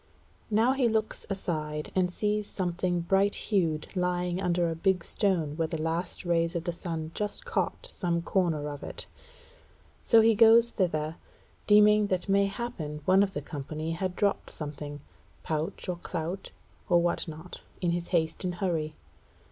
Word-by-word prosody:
Now 225 +4 +4
he 265 -3 +2
looks 220 0 -1
aside, 155 -6 -3
and 180 -1 +2
sees 210 +2 -1
something 175 -1 -1
bright 195 +4 +2
hued 165 -5 0
lying 180 0 0
under 175 -2 +1
a 165 - -2
big 180 +1 +1
stone 170 -8 0
where 165 -1 +1
the 160 -1 -4
last 165 +3 -2
rays 170 -1 +1
of 170 - -1
the 175 - -1
sun 165 -2 -4
just 210 - -3
caught 480 +1 -1
some 170 -2 -1
corner 170 -6 0
of 145 -1 -6
it. - - -5 1.0
So 230 -2 +6
he 225 +1 +5
goes 230 +2 +6
thither, 160 -4 -1 0.5
deeming 210 0 +6
that 185 -1 -1
mayhappen 195 -6 -1
one 190 +1 +5
of 200 -1 +1
the 145 - -4
company 155 +3 -5
had 180 +2 -2
dropped 200 0 0
something, 145 -1 -7 0.4
pouch 160 +4 -3
or 180 -1 -2
clout, 175 +2 -4 0.4
or 175 -1 +6
what 170 0 0
not, 160 +3 -8 0.2
in 175 -2 +1
his 175 0 -2
haste 165 -1 0
and 180 -1 -2
hurry. 165 -4 -1
175 Hz, 160 wpm, -29 LUFS, 160-200 Hz, 1.0 s, So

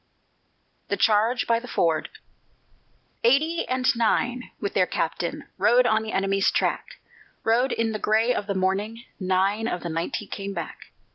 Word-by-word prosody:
THE - - -1
CHARGE 225 +3 +3
BY 230 0 +2
THE 250 - -10
FORD 165 -8 0 1.1
Eighty 305 +8 +2
and 255 -1 +1
nine 245 +2 0
with 200 - -3
their 185 -1 +3
captain 165 +1 -2 0.2
Rode 240 +6 +5
on 220 -2 +3
the 220 0 -5
enemy's 195 0 +2
track, - - -1 0.5
Rode 245 +4 +2
in 230 -1 0
the 215 - -3
gray 220 +4 +2
of 205 - -3
the 200 - -1
morning: 200 +5 -1 0.2
Nine 195 +4 +1
of 180 - -3
the 170 - -3
ninety 165 +5 -3
came 200 0 -6
back. - - -6
215 Hz, 155 wpm, -25 LUFS, 195-240 Hz, 1.1 s, Rode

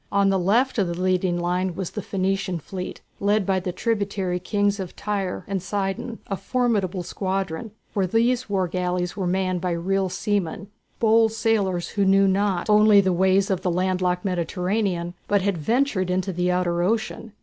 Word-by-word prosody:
On 200 0 +3
the 195 -1 +2
left 230 +8 +2
of 195 - +2
the 170 0 -4
leading 185 -1 +1
line 180 +1 -1
was 190 -2 -4
the 210 - -4
Phoenician 195 -1 -1
fleet 180 +3 -7 0.2
led 205 0 +2
by 190 0 +1
the 180 0 -3
tributary 200 -3 -1
kings 205 +2 0
of 185 -2 -6
Tyre 200 -3 -3
and 195 -2 -2
Sidon, 195 +4 -3
a 195 - -3
formidable 205 -6 0
squadron, 190 +1 -3 0.2
for 195 -3 0
these 235 +4 +1
war 190 -2 +1
galleys 180 0 -2
were 190 -3 -2
manned 185 -1 0
by 180 - -1
real 190 +3 0
seamen, 200 -1 -2 0.3
bold 225 0 +4
sailors 205 -5 0
who 200 - 0
knew 195 0 +5
not 195 -2 +1
only 210 -1 +6
the 190 -2 +2
ways 190 +2 +3
of 185 - 0
the 180 - 0
land 185 +1 0
locked 180 +1 0
Mediterranean, 180 0 -1
but 205 -2 +2
had 195 -4 0
ventured 225 - +1
into 185 +1 -1
the 180 +1 0
outer 175 -1 +1
ocean. 220 +2 -1
190 Hz, 180 wpm, -24 LUFS, 180-205 Hz, 0.3 s, only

